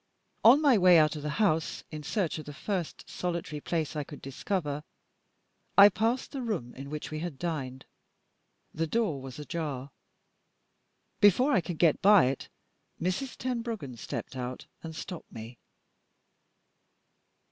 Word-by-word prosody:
On 245 +6 +8
my 265 -7 +5
way 180 -1 +7
out 155 0 +4
of 150 - -5
the 150 - -3
house, 165 -7 +1
in 155 -1 -6
search 170 0 -1
of 155 - -8
the 145 - -8
first 180 0 -4
solitary 170 -4 -4
place 160 -2 -2
that 155 - -3
I - - -1
could 145 +1 -10
discover, 150 +1 -3 0.9
I 200 +1 +11
passed 225 +6 -1
the 275 - -4
room 200 - -3
in 140 +1 -8
which 150 +1 -5
we 155 - -3
had 165 -4 -5
dined. 135 -6 -4 0.9
The 165 +1 -1
door 185 - 0
was 130 -1 -8
ajar. 145 -3 -4 1.3
Before 230 - +5
I 190 - +4
could 170 -1 -5
get 165 -3 +3
by 200 -3 +7
it, 135 +1 -2 0.5
Mrs. 185 +10 -2
Tenbruggen 230 - -3
stepped 115 - -6
out 125 0 -5 0.2
and 160 -1 -7
stopped 175 +1 -7
me. 115 +2 -9
160 Hz, 150 wpm, -29 LUFS, 145-200 Hz, 1.3 s, I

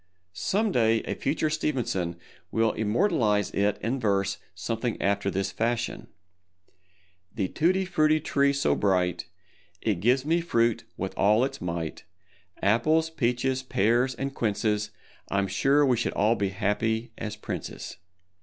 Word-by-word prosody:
Some 205 - 0
day 115 -5 +2
a - - -3
future 155 +2 -1
Stevenson 120 - -1 0.3
will 115 -1 +2
immortalize 110 - +1
it 100 +1 +1
in 125 +4 -1
verse 100 -3 0 0.2
something 115 +5 -3
after 100 0 +1
this 95 0 -1
fashion, 120 +2 -2 1.3
The 95 -4 -1
Tutti 185 +4 +1
Frutti 155 -4 +3
Tree 140 -2 +2
so 140 0 +1
bright, 90 -3 +1 0.5
It 100 -4 -1
gives 125 +7 +2
me 165 +2 +2
fruit 115 -8 +1
with - - -3
all 105 +4 +4
its 135 0 -6
might, 85 -2 -4 0.6
Apples, 155 +10 +3
peaches, 130 -2 0
pears 125 +1 +1
and 135 0 -3
quinces, 105 -2 0 0.4
_I'm 100 0 +1
sure 140 +9 +3
we 125 -3 +3
should 120 - -1
all 105 +3 +3
be 100 -3 -1
happy 110 +4 -1
as 110 -1 -4
princes. 105 - -6
115 Hz, 135 wpm, -27 LUFS, 100-135 Hz, 1.3 s, all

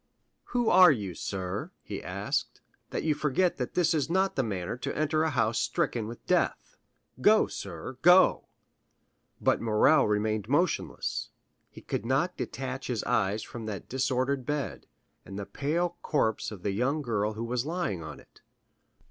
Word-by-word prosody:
"Who 245 -2 -1
are 180 -2 +8
you, 100 -9 -2
sir," 95 - -4
he 100 - -6
asked, 100 +3 -3 0.3
"that - - -3
forget 155 +5 +1
that 125 - -4
this 175 -1 +3
is 155 -2 0
not 190 +2 +1
the 135 - +2
manner 100 -5 -3
to - - -4
enter 155 +1 +1
a 160 - +2
house 115 -5 +1
stricken 115 -3 -1
with 115 +1 -9
death? - - 0 0.5
Go, - - +6
sir, 130 - -7
go!" 180 +2 +6 0.9
But - - +2
Morrel 110 -2 +4
remained 105 0 0
motionless; 170 +6 0 0.4
he - - -13
could - - -3
not 140 +9 +1
detach 135 0 -5
his 120 -4 -2
eyes 110 -3 +1
from 115 -2 -8
that 100 -3 -6
disordered 130 +1 0
bed, 130 - -3 0.4
and 95 +1 -9
the 100 - -4
pale 170 - -1
corpse 110 -7 0
of 100 -4 -10
the 100 - 0
young 135 +9 0
girl 110 -3 0
who 110 +2 -5
was 125 +3 -2
lying 165 - -2
on 80 - -8
it. - - -21
125 Hz, 160 wpm, -29 LUFS, 105-155 Hz, 0.9 s, are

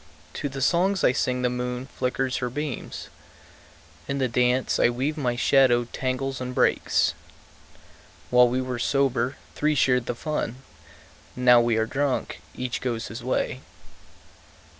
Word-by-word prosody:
To 145 - -3
the 135 -1 -4
songs 185 +5 +2
I - - +5
sing 125 -1 -1
the 125 - +3
moon 125 0 -3
flickers 130 -1 -2
her 125 - -2
beams; 145 0 -5 1.0
In 140 - -2
the 130 -2 +1
dance 125 +2 +1
I - - +5
weave 130 +5 -1
my 125 -5 -1
shadow 125 -1 +4
tangles 130 0 -2
and 125 0 -5
breaks. - - +2 1.2
While 125 0 +7
we 130 +1 -1
were 125 -1 -4
sober, 135 0 +1 0.2
three 150 0 +1
shared 125 -3 +2
the 120 - -2
fun; 150 -4 -3 0.8
Now 125 -1 +6
we 115 -1 +1
are 110 - +2
drunk, 140 +2 -2
each 125 -1 -3
goes 115 -3 -3
his 115 +2 -8
way. 130 0 -1
125 Hz, 145 wpm, -25 LUFS, 125-135 Hz, 1.2 s, While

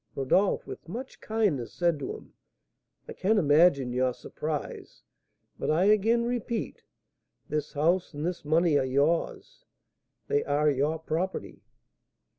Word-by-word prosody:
Rodolph, 180 +9 +1
with - - -9
much 250 +8 -7
kindness, 205 - -1
said 170 -4 +1
to 140 - -4
him: - - -14 0.7
"I - - -7
can 215 +4 +1
imagine 145 -6 +4
your 125 0 +1
surprise; 150 -1 -6 0.6
but - - -2
I 160 +4 +3
again 215 +3 +3
repeat, 240 -1 -3 0.7
this 150 -1 -3
house 170 +5 +1
and 150 0 -5
this 175 0 -3
money 155 0 +3
are - - +1
yours, 140 +6 -1 0.6
they 145 - +1
are 145 +1 +2
your 145 +4 0
property." 160 +4 -4
160 Hz, 130 wpm, -28 LUFS, 145-190 Hz, 0.7 s, imagine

